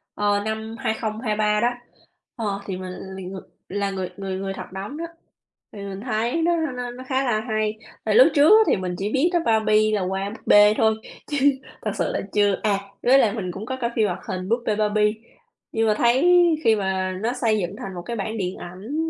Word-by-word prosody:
ờ, 205 0 +1
năm 220 +1 -4
2023 215 -1 0
đó, 240 - +4 0.7
ờ, 205 -4 -2
thì 190 -2 -4
mình 185 0 -6 0.2
mình 185 -1 -7
người 190 - -7 0.3
là 200 +1 -1
người 190 -2 -3
người 195 -1 -4
người 195 0 -3
thật 195 - -8
đóng 200 +10 -6
đó, 335 - -4 0.7
thì 205 - -9
mình 195 0 -6
thấy 240 +6 -1
nó 340 +1 +2
nó 250 -6 -3
nó 250 +1 -9
khá 265 0 +1
là 240 -4 +1
hay. 215 0 0 0.3
Tại - - +1
lúc - - +8
trước 290 +2 +6
á 440 +1 +8
thì - - +4
mình 180 -1 -3
chỉ 205 +2 -2
biết 280 +6 +3
đó 345 - +4
Barbie 215 -1 +3
là 200 - 0
qua 190 +2 -2
búp 220 - -10
bê 205 0 +7
thôi, 220 -1 +3 0.3
chứ 290 - -2 0.4
thật - - -2
sự - - 0
là - - -1
chưa 205 -2 +2
à, 205 -2 +2 0.2
với 265 +2 +6
lại 215 -4 +3
mình 185 -6 -3
cũng 195 +4 -7
có 260 +2 -4
coi 235 - +1
phim 215 -3 +3
hoạt 180 0 -3
hình 185 -1 -4
"Búp 235 +1 +1
bê 210 - +1
Barbie." 210 0 +2 0.6
Nhưng 225 0 +1
mà 215 - +4
thấy 245 +5 +3 0.4
khi 225 -1 +5
mà 190 -2 -1
nó 240 +2 0
xây 225 -4 +1
dựng 175 - -3
thành 190 -1 -7
một 175 - -5
cái 235 - -4
bản 220 +1 -3
điện 185 -2 -3
ảnh 235 - -4
215 Hz, 225 wpm, -23 LUFS, 195-235 Hz, 0.7 s, lúc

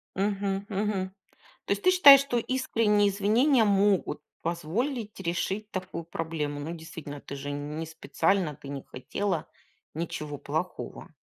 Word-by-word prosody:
Мгм, 195 0 -1
мгм. 195 -2 -1 0.5
То - - -3
есть 200 - -5
ты 370 - +6
считаешь, 285 -7 +10
что 260 -4 -1
искренние 225 -5 +2
извинения 225 +6 +3
могут 200 -2 +2 0.2
позволить 205 - -2
решить 190 +4 -2
такую 185 -2 -4
проблему? 160 -3 -3
Ну, 160 +4 -4
действительно, 160 -3 -8
ты 140 - -7
же 140 +1 -5
не 150 +3 -4
специально, 165 0 0
ты 140 -1 -11
не 140 -1 -5
хотела 170 +6 -3 0.5
ничего 155 -2 -4
плохого. 160 +7 -4
190 Hz, 135 wpm, -28 LUFS, 160-210 Hz, 0.5 s, считаешь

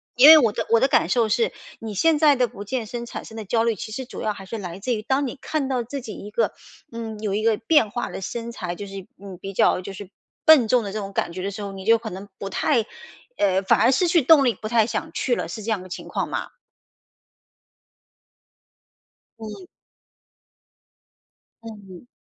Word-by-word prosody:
因 255 +4 +8
为 315 +1 +12
我 235 -8 +4
的 - - -3
我 230 0 +4
的 265 - +3
感 - - +3
受 230 -3 +2
是， 450 - +1 0.3
你 220 -1 -6
现 315 - +3
在 295 -2 +6
的 250 -2 +1
不 205 -3 -9
健 240 +2 -3
身 235 +2 -6
产 - - -7
生 220 - -11
的 220 - -6
焦 225 +3 +1
虑， 230 0 +2
其 215 +2 -7
实 260 +3 -5
主 245 - -9
要 215 - -1
还 195 -1 -11
是 225 +4 -6
来 180 -4 -6
自 240 +6 -2
于 215 - -2
当 265 +6 0
你 260 +2 -5
看 295 -4 -2
到 255 -2 0
自 265 +4 -6
己 225 -3 -8
一 205 - -9
个 220 +2 0 0.4
嗯， 225 -2 -6
有 210 -3 -2
一 210 - 0
个 225 0 +3
变 225 +1 +3
化 240 +3 -3
的 - - -6
身 230 +4 -5
材， 180 -6 -5
就 205 - -7
是， 195 -1 -9 0.2
嗯， 195 -2 -9
比 195 - -7
较 185 - +3
就 190 +2 -7
是 195 -1 -9 0.3
笨 300 -8 +7
重 245 +1 +3
的 200 - -5
这 215 - -4
种 195 -1 -6
感 170 - -1
觉 185 +2 -6
的 195 +2 -3
时 200 - -7
候， 200 -1 -5
你 190 -1 -9
就 230 +1 +5
可 225 - -7
能 190 +3 -8
不 195 - -5
太 235 +2 +1 0.5
呃， 190 -1 +2
反 195 - +3
而 245 - +5
失 350 +6 +2
去 335 -1 +4
动 290 +1 +6
力， 245 -4 +2
不 215 - -7
太 225 -1 +3
想 220 -1 -3
去 245 - 0
了， - - -3
是 220 - -7
这 225 - -2
样 205 -4 -1
的 - - -11
情 180 - -8
况 - - -2
吗？ - - -4 2.9
嗯。 220 - -9 2.0
嗯。 205 -3 -11
225 Hz, 245 characters per minute, -23 LUFS, 200-245 Hz, 2.9 s, 为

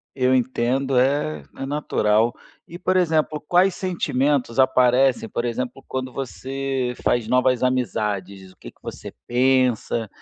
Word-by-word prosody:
Eu 130 -1 +2
entendo, 130 +1 +1
é 125 - 0
é 135 - -4
natural. 115 -6 +1 0.3
E, 170 - -9
por 185 +1 0
exemplo, 155 -3 +1
quais 180 +1 +4
sentimentos 140 - -1
aparecem, 130 -1 +3
por 120 - -3
exemplo, 125 +2 -4
quando 130 -1 -4
você 135 -1 -3
faz 120 -3 +1
novas 125 0 +2
amizades, 105 -7 -2
o - - -22
que - - -10
que - - -36
você - - -8
pensa, 125 -2 +1
130 Hz, 135 wpm, -22 LUFS, 120-135 Hz, 0.3 s, quais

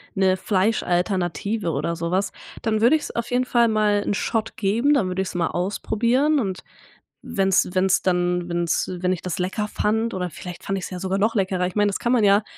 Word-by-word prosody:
'ne 190 -1 +3
Fleischalternative 190 -1 0
oder 160 +4 -2
so 170 +1 -3
was.“ 190 +2 0 0.3
Dann 220 -2 0
würde 240 +8 +5
ich's 305 - -3
auf 235 - -4
jeden 250 +1 +2
Fall 235 -2 +3
mal 210 -2 +2
'n - - 0
Shot 220 +2 -2
geben, 230 +9 +2
dann 215 -10 +2
würde 185 +1 -1
ich's 185 -1 -5
mal 170 -2 +1
ausprobieren 235 +10 +1
und 190 -6 -3 0.6
wenn's 190 -2 +2
wenn's 185 0 +2
dann 180 -1 0
wenn's 170 -1 0
wenn 180 0 +1
ich 180 - -3
das 180 -1 -3
lecker 190 +4 -1
fand 220 +3 -1
oder 180 -1 -2
vielleicht 180 +2 -9
fand 195 - -2
ich's 190 - -6
ja 180 - -5
sogar 190 +1 -1
noch 215 +3 +2
leckerer, 190 -3 0
ich 180 - -3
meine, 205 -1 +3
das 200 - -2
kann 240 - -1
man 235 -4 +3
ja 200 +1 +5
195 Hz, 210 wpm, -23 LUFS, 180-220 Hz, 0.6 s, würde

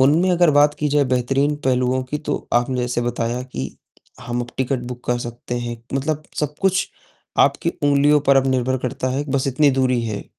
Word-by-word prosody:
उनमें 155 +8 +4
अगर 175 -2 +4
बात 145 0 +4
की 150 - -1
जाए 145 0 +3
बेहतरीन 135 +3 +1
पहलुओं 130 0 +1
की 150 +4 -4
तो 150 -1 -4
आपने 120 +2 +1
जैसे 125 0 -1
बताया 120 +1 -2
कि 70 - -6 0.4
हम 120 +1 -3
अब 120 - -5
टिकट 130 0 0
बुक 125 0 -8
कर 120 0 +1
सकते 120 +1 -6
हैं, 120 -1 -4 0.2
मतलब 150 +3 -1 0.2
सब 150 0 -2
कुछ 190 -1 +2 0.5
आपकी - - +3
उंगलियों 145 +1 +4
पर 140 -1 +4
अब 135 0 +3
निर्भर 130 0 +1
करता 130 +1 -3
है, 140 +3 -1
बस 135 0 0
इतनी 140 +2 +3
दूरी 130 -2 +1
है, 110 -3 -4
130 Hz, 195 wpm, -21 LUFS, 125-145 Hz, 0.5 s, उनमें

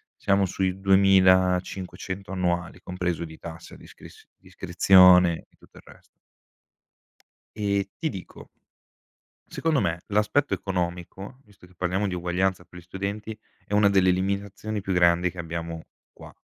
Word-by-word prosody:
siamo 100 -1 +1
sui 95 0 -2
2.500 95 0 +2
annuali, 90 -1 -2
compreso 90 -2 -3
di 80 -1 -12
tassa 85 0 -10
d'iscris - - -16
d'iscrizione, 90 -1 +4
e - - -32
tutto - - -21
il - - -15
rest - - -17 1.6
E 100 -1 -1
ti 160 -2 -2
dico 95 -5 -10 1.0
secondo 160 -4 0
me, 85 +1 -2
l'aspetto 105 +7 +1
economico, 90 +4 -5
visto 100 -5 -20
che 90 - -23
parliamo 95 +3 -1
di 90 - -4
uguaglianza 90 +1 -1
per 90 - -13
gli - - -20
studenti, 100 +4 -6 0.3
è 105 - -5
una 105 -1 +5
delle 95 -2 +3
limitazioni 100 +3 -3
più 95 0 -4
grandi, 90 0 +3
che 90 - -15
abbiamo, 85 0 -6 0.3
qua. - - -14
95 Hz, 135 wpm, -25 LUFS, 90-100 Hz, 1.6 s, una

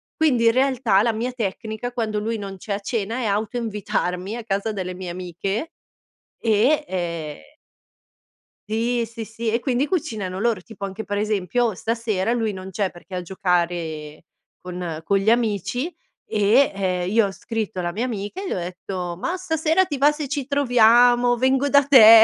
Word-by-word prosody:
Quindi 255 -7 +3
in 230 - +7
realtà 255 -6 +3
la 230 -2 +2
mia 240 +3 -2
tecnica, 220 +1 -4
quando 220 -3 -1
lui 225 +2 -2
non 195 -1 -6
c'è 200 +2 -4
a 200 - -2
cena, 225 +2 -2
è 245 - -2
auto 210 +3 -1
invitarmi 205 -3 -2
a 240 - -6
casa 200 +1 -1
delle 185 -3 -4
mie 180 -1 -6
amiche. 185 - -4 0.7
E 235 +8 +3
ehm 170 - -3 1.3
Sì, 230 +2 0
sì, 225 0 -7
sì 225 +1 -4
e 230 - +1
quindi 260 +2 0
cucinano 220 - -2
loro, 225 -4 +1
tipo 200 0 -7
anche 195 +3 -6
per 205 -1 -3
esempio 210 +1 0
stasera 225 -1 -1
lui 225 -3 0
non 190 0 -7
c'è 195 0 -1
perché 175 +2 -14
è - - -1
a - - -2
giocare 170 -4 -2 0.4
con 175 -3 -5
con 200 +2 +2
gli 195 +3 +2
amici 235 - 0 0.3
e, 215 +6 +3
ehm, 185 -2 -1
io 225 -1 +4
ho - - -5
scritto 220 -2 -4
alla 175 -1 -1
mia 225 +7 -2
amica 220 - -4
e 395 - -5
le - - -1
ho - - -2
detto: 180 0 -5
"Ma 350 - -1
stasera 320 0 +2
ti 295 -6 -3
va 290 +2 +5
se 295 -3 -5
ci 280 -3 -2
troviamo, 245 -2 +5
vengo 260 +3 +2
da 285 0 +5
te.". 225 -5 +10
220 Hz, 180 wpm, -23 LUFS, 190-245 Hz, 1.3 s, te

